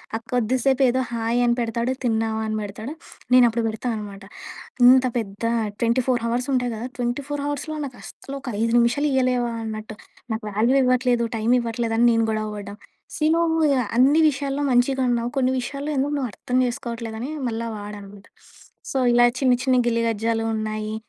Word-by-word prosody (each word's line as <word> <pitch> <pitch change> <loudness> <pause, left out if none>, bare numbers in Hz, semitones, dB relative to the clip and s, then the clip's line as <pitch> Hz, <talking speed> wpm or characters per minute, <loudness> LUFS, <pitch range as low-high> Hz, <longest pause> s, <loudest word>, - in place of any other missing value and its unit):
ఆ - - +1
కొద్దిసేపు 255 +3 +1
ఏదో 255 +2 +1
హాయ్! 230 +1 0
అని 240 0 +2
పెడతాడు 235 +1 -1
తిన్నావా? 220 -2 0
అని 215 - -2
పెడతాడు 215 +7 -6 0.4
నేను 250 -1 +8
అప్పుడు 230 +1 -2
పెడతా 220 +3 -4
అనమాట 200 -2 -8 0.6
ఇంత 260 0 +7
పెద్ద 205 -1 -5 0.4
24 240 +1 +1
అవర్స్ 245 +2 -1
ఉంటాయి 245 -2 0
కదా! 230 +3 -5
24 275 +4 -3
అవర్స్‌లో 300 +2 -4
నాకు 255 -2 -9
అస్సలు 275 - -9
ఒక 250 -3 -5
5 230 0 +1
నిమిషాలు 245 +5 +2
ఇవ్వలేవా? 250 -2 +1
అన్నట్టు. 215 -1 -6 0.4
నాకు 220 -1 -5
వాల్యూ 225 +6 +2
ఇవ్వట్లేదు, 250 -1 +2
టైమ్ 230 +3 +2
ఇవ్వట్లేదని 230 0 +1
నేను 230 0 +2
గొడవ 215 0 -2
పడడం. 205 0 -8 0.4
సీ 305 - 0
నువ్వు 325 -1 +1 0.4
అన్ని 285 +6 +5
విషయాల్లో 280 0 -2
మంచిగా 260 +2 +2
ఉన్నావు 235 0 0
కొన్ని 260 0 +2
విషయాల్లో 280 +4 -4
ఎందుకు 285 +2 0
నువ్వు 260 -3 -2
అర్థం 250 0 -2
చేసుకోవట్లేదని 235 +2 -5 0.2
మళ్ళ 225 0 -4 0.2
వాడనమాట. 205 -1 -10 0.7
సో 270 - -1 0.2
ఇలా 240 0 +6
చిన్ని, 255 -3 +3
చిన్ని 255 -1 +3
గిల్లి 230 0 +1
గజ్జాలు 225 +1 -1
ఉన్నాయి. 215 0 -3
240 Hz, 160 wpm, -23 LUFS, 225-260 Hz, 0.7 s, నేను